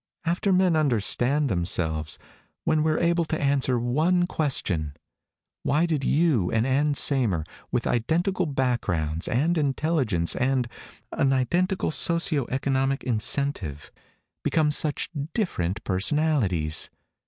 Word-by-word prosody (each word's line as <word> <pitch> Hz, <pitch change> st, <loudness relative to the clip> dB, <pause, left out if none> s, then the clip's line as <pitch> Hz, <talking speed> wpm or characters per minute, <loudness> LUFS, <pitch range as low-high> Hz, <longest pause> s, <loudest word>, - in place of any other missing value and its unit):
"After 175 Hz, +4 st, 0 dB
men 185 Hz, -2 st, +3 dB
understand 140 Hz, +1 st, +2 dB
themselves. 85 Hz, -, 0 dB, 0.5 s
When 155 Hz, -1 st, +1 dB
we're 155 Hz, 0 st, +1 dB
able 170 Hz, 0 st, +1 dB
to 160 Hz, 0 st, -3 dB
answer 140 Hz, -3 st, +1 dB
one 155 Hz, +10 st, +1 dB
question: 90 Hz, -, 0 dB, 0.7 s
why 150 Hz, +4 st, +1 dB
did 155 Hz, -5 st, -1 dB
you 140 Hz, -, +2 dB
and 110 Hz, +1 st, +1 dB
Ann 140 Hz, +2 st, +1 dB
Saymer, 115 Hz, -, +2 dB, 0.3 s
with 125 Hz, -1 st, -1 dB
identical 175 Hz, -, 0 dB
backgrounds, 110 Hz, -, -1 dB
and 160 Hz, +8 st, +1 dB
intelligence, 135 Hz, -, 0 dB
and 130 Hz, -1 st, 0 dB, 0.4 s
an 135 Hz, -, +1 dB
identical 175 Hz, +9 st, 0 dB
socio 160 Hz, -5 st, +1 dB
economic 135 Hz, 0 st, -1 dB
incentive, 110 Hz, -, -1 dB, 0.5 s
become 155 Hz, -2 st, +1 dB
such 150 Hz, 0 st, +1 dB, 0.2 s
different 105 Hz, -, -2 dB
personalities? 95 Hz, -, +1 dB
135 Hz, 110 wpm, -25 LUFS, 110-160 Hz, 0.7 s, men